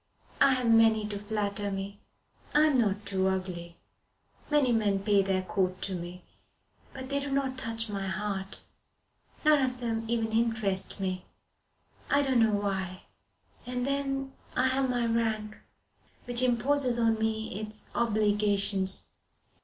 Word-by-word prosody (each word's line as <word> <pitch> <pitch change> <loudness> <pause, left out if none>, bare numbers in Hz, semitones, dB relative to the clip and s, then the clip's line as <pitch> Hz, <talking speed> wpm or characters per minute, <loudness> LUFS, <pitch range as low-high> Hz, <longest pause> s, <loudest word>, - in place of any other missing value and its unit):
I 275 - +6
have 250 -2 -1
many 225 -1 +5
to 205 -1 -4
flatter 205 -1 -2
me. 195 +1 -5 0.6
I 300 +1 +6
am 290 -4 +3
not 205 -1 -1
too 190 -1 +1
ugly. 180 -3 -3 0.7
Many 295 -4 +3
men 205 -4 +1
pay 205 -1 +4
their 190 -1 0
court 185 -1 -1
to 195 - -2
me, 175 0 -6 0.7
but 260 -1 -8
they 280 0 +1
do 280 0 -4
not 275 -1 0
touch 230 -2 -3
my 200 -2 -3
heart. 195 0 -4 0.8
None 305 -2 +6
of 255 -1 -1
them 225 -2 -2
even 225 -1 0
interest 220 -4 -1
me. 185 -1 -3 0.8
I 285 0 +4
don't 260 -3 +2
know 225 -1 +5
why. 195 -3 -2 0.6
And 250 0 -2
then 270 -1 -1 0.2
I 255 +1 +3
have 265 0 +1
my 245 -1 +1
rank, 220 -2 -1 0.6
which 245 0 0
imposes 255 +1 +2
on 225 -1 +2
me 220 -2 -2
its 215 0 -2
obligations. 205 -3 +1
220 Hz, 145 wpm, -29 LUFS, 195-250 Hz, 0.8 s, I